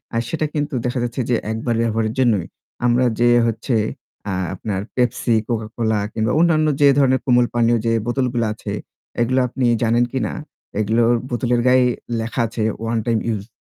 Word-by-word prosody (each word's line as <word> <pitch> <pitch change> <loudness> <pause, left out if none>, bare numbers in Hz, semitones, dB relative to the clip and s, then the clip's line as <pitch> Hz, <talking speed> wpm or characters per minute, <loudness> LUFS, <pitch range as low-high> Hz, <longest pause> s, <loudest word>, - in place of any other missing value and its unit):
আ - - +2
সেটা 155 +4 -1
কিন্তু 150 -1 -2
দেখা 125 +1 -1
যাচ্ছে 120 +2 -2
যে 120 - +3 0.2
একবার 115 +1 -1
ব্যবহারের 115 -1 0
জন্যই, 110 -9 +2 0.4
আমরা 120 +1 +3
যে 120 - +4 0.2
হচ্ছে 115 +2 -1 0.6
আ - - -1 0.2
আপনার 95 0 -3
পেপসি, 125 -1 +1
কোকাকোলা 110 -1 -1
কিংবা 110 0 0
অন্যান্য 160 -2 +3
যে 145 - +7
ধরনের 130 -2 +3
কোমল 125 -2 +4
পানীয় 120 0 +3
যে 115 - +2 0.2
বোতলগুলো 120 -2 0
আছে - - -7 0.5
এগুলো 130 +3 +2
আপনি 125 +1 -2 0.2
জানেন 120 +1 +3
কিনা 125 -6 -2 0.5
এগুলো 110 +3 +2 0.3
বোতলের 120 0 0
গায়ে 125 0 +5 0.3
লেখা 115 +3 -2
আছে 110 0 -3 0.2
'ওয়ান 115 +1 -1
টাইম 115 -2 +1
ইউস', 105 -3 -2
120 Hz, 165 wpm, -20 LUFS, 115-125 Hz, 0.6 s, যে